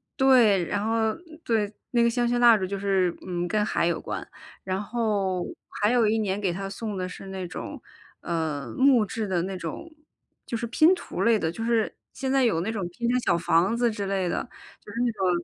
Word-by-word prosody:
对， 240 -9 +5
然 205 +3 -2
后 225 -1 +1 0.3
对， 215 -3 0 0.2
那 240 -1 +3
个 235 - +4
香 240 0 0
薰 240 0 +1
蜡 235 -2 +7
烛 190 - -2
就 200 +1 -4
是， 190 -3 +1
嗯， 175 -1 -2
跟 210 +3 +1
海 170 - +1
有 170 - 0
关。 - - -5 0.4
然 190 +1 -2
后 205 -5 -1 0.4
还 210 +3 +4
有 235 -3 +4
一 220 +1 +2
年 200 -2 -1
给 190 -4 0
她 195 +1 -4
送 210 0 -5
的 185 0 -2
是 195 - -9
那 190 -1 -5
种， 175 - -7 0.4
呃， 155 -7 -3
木 260 -4 +5
质 215 +1 -4
的 180 -3 0
那 190 0 -4
种 180 - -6 0.5
就 235 - -4
是 235 - -3
拼 315 +9 +5
图 - - -4
类 230 -1 +4
的， 160 -2 -1
就 225 +6 -6
是 230 -2 +1 0.2
现 265 -1 -3
在 270 -2 +3
有 165 -8 +2
那 220 +6 -2
种 195 -6 -3
拼 235 +7 -3
成 250 - +2
小 170 - +2
房 170 +6 +2
子 240 0 +2
之 205 -2 -4
类 190 -2 -1
的， - - -2 0.8
就 185 - +3
是 175 - +3
那 170 - -5
205 Hz, 235 characters per minute, -26 LUFS, 185-235 Hz, 0.8 s, 蜡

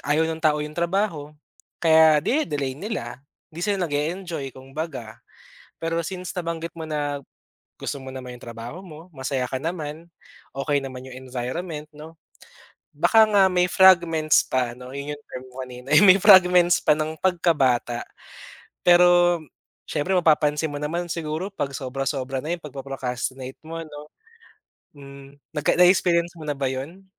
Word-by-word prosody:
ayaw 150 +3 +1
ng 160 0 -3
tao 150 -2 +2
yung 150 - -8
trabaho 170 -2 -1 0.5
kaya 160 -2 +5
dine-delay 145 - 0
nila. 140 - -6 0.3
Hindi 165 - -8
sila 200 +2 0
nag-e-enjoy, 160 0 -3
kumbaga. 135 -4 -7 0.6
Pero 165 0 -1
since 185 -2 -6
nabanggit 170 -2 -4
mo 160 - -5
na 145 -2 -2 0.6
gusto 145 - -4
mo 130 - -9
naman 125 -2 -8
yung - - -14
trabaho 120 +11 -8
mo, 165 +1 -12
masaya 130 -2 -3
ka 130 - -2
naman, 160 +1 -5 0.6
okey 145 +1 +1
naman 130 -1 -6
yung 130 - -10
environment, 150 +5 -5
'no. 155 +2 -12 0.8
Baka 225 -1 +5
nga 205 -2 +4
may 180 -1 +2
fragments 170 -4 +4
pa, 125 -2 -1
'no, 125 +1 -10
yun 145 +1 -5
yung 145 - -22
term 130 - -8
mo 130 +1 -7
kanina, 125 +1 -11
eh. - - +7
May 190 0 +7
fragments 180 -3 +7
pa - - +3
nang 155 +1 -3
pagka-bata. 145 -10 +1 0.8
Pero 175 0 +5 0.5
siyempre, 185 +6 -1
mapapansin 150 -2 +2
mo 145 - -5
naman 170 +4 -2
siguro 160 +2 -3
'pag 145 -8 -3
sobra-sobra 135 0 -3
na 155 - -5
yung 165 - -22
pagpo-procrastinate 130 -2 -5
mo 165 +1 -7
'no? 150 -1 -11 0.9
Hmm. 140 0 -13 0.2
Nagka 150 -1 +1
na-experience 175 -1 +4
mo 155 - -8
na 145 - -1
ba 135 - 0
yun? 155 +9 -7
150 Hz, 150 wpm, -24 LUFS, 135-175 Hz, 0.9 s, eh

